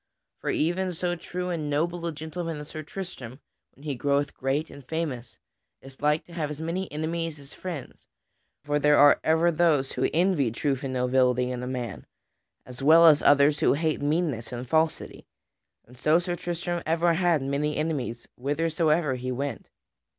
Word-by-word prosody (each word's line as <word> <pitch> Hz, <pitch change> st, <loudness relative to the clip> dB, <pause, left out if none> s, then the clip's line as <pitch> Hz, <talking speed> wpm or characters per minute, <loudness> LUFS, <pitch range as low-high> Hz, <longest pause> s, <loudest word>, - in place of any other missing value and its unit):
For -, -, -4 dB
even 180 Hz, +3 st, 0 dB
so 175 Hz, +1 st, -1 dB
true 180 Hz, +2 st, -5 dB
and 155 Hz, -4 st, -3 dB
noble 170 Hz, +4 st, -1 dB
a -, -, -1 dB
gentleman 160 Hz, +1 st, -5 dB
as 150 Hz, 0 st, -8 dB
Sir 155 Hz, -, -6 dB
Tristram, 155 Hz, -7 st, -8 dB, 0.4 s
when 140 Hz, -, -18 dB
he 150 Hz, -2 st, -2 dB
groweth 140 Hz, +2 st, 0 dB
great 140 Hz, +4 st, -2 dB
and 140 Hz, -, -12 dB
famous, 140 Hz, -5 st, -4 dB, 0.4 s
is 135 Hz, 0 st, -15 dB
like 150 Hz, +1 st, +1 dB
to 175 Hz, -, -15 dB
have 155 Hz, -3 st, -2 dB
as 150 Hz, 0 st, -6 dB
many 170 Hz, +4 st, -3 dB
enemies 160 Hz, +1 st, -3 dB
as 140 Hz, -1 st, -14 dB
friends. 170 Hz, -8 st, -7 dB, 0.6 s
For 145 Hz, 0 st, 0 dB
there 150 Hz, 0 st, +4 dB
are 145 Hz, 0 st, +7 dB
ever 160 Hz, +2 st, +3 dB
those 155 Hz, -5 st, +2 dB
who -, -, 0 dB
envy 165 Hz, -6 st, +2 dB
truth 135 Hz, +3 st, -2 dB
and 135 Hz, -, -3 dB
nobility 125 Hz, 0 st, +2 dB
in 125 Hz, -1 st, -4 dB
a 125 Hz, -, -4 dB
man, 125 Hz, -2 st, -5 dB, 0.6 s
as 125 Hz, +1 st, -10 dB
well 160 Hz, +4 st, +7 dB
as 155 Hz, -3 st, +7 dB
others 145 Hz, +1 st, +5 dB
who -, -, +4 dB
hate 155 Hz, +1 st, -1 dB
meanness 145 Hz, -6 st, -1 dB
and 125 Hz, +1 st, -5 dB
falsity, 160 Hz, +2 st, -1 dB, 0.6 s
and 125 Hz, -, -17 dB
so 155 Hz, +5 st, +3 dB
Sir 175 Hz, 0 st, -2 dB
Tristram 175 Hz, 0 st, -3 dB
ever 165 Hz, +1 st, +2 dB
had 170 Hz, -4 st, +2 dB
many 145 Hz, +2 st, -1 dB
enemies 140 Hz, -7 st, -3 dB
whithersoever 155 Hz, +2 st, +1 dB
he 130 Hz, 0 st, -4 dB
went. 140 Hz, +3 st, -4 dB
150 Hz, 175 wpm, -26 LUFS, 135-165 Hz, 0.6 s, are